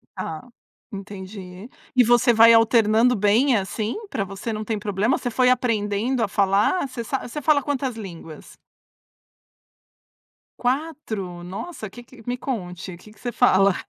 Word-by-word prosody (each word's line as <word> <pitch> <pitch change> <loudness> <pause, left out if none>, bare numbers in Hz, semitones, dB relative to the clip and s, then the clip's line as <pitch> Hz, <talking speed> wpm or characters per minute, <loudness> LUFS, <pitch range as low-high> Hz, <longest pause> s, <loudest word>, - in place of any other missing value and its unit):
Tá. 160 -5 -5 0.5
Entendi. 195 0 -9 0.3
E 250 - +6
você 240 +1 +4
vai 225 +1 +8
alternando 225 +1 +4
bem 225 +6 +3
assim? 210 +2 -2
Pra 200 - -2
você 195 +4 -6
não 215 0 -4
tem 215 -1 -2
problema? 205 +4 0
Você 245 - -3
foi 250 +2 +3
aprendendo 230 0 0
a - - +1
falar? 200 - +2
Você 250 -3 -6
sa 265 +3 -3
você 295 +5 -6
fala 295 0 +4
quantas 265 -3 -2
línguas? 170 -7 -10 2.0
4? 245 - -3
Nossa 215 - -7
que 240 +5 -12
que, 245 0 -16
me 245 0 -1
conte. 185 -8 -5
Que 210 +4 -16
que 215 - -24
você 240 - -4
fala? 200 -5 +4
220 Hz, 145 wpm, -23 LUFS, 195-250 Hz, 2.0 s, vai